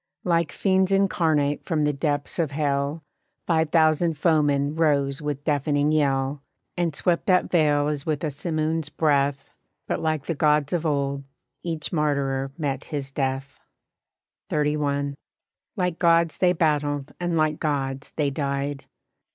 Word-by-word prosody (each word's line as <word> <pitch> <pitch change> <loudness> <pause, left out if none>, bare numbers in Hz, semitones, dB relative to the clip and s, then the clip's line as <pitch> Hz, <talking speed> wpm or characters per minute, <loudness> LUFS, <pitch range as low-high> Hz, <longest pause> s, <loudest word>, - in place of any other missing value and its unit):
Like 170 -3 +1
fiends 190 -1 +1
incarnate 160 -7 +2
from 160 -4 0
the 150 0 +1
depths 145 +2 -2
of 165 -3 +1
hell 145 +1 -1 0.4
Five 160 -2 +1
thousand 160 0 +3
foemen 145 -3 +2
rose 145 -3 +1
with 145 -1 -3
deafening 145 0 +1
yell, 140 -2 +1 0.3
And 170 -4 -1
swept 170 +1 0
that 185 -2 +3
vale 150 -4 +3
as 150 -2 -2
with 155 -1 -2
a 155 - -1
simoon's 155 +1 -2
breath, 140 -3 0 0.3
But - - -2
like 155 -2 -1
the 165 - -1
gods 150 0 +2
of 170 -2 0
old, 140 -1 -1 0.4
each 165 -2 -3
martyr 140 -3 0
met 140 -4 -3
his 140 -3 -4
death. 135 0 -3 0.9
XXXI. 145 -1 0 0.6
Like 180 -3 -1
gods 170 -1 +3
they 180 -1 +4
battled 150 -3 0
and 175 -1 -1
like 155 -1 +1
gods 135 -3 -2
they 145 -3 0
died. 140 0 -3
150 Hz, 140 wpm, -24 LUFS, 140-160 Hz, 0.9 s, they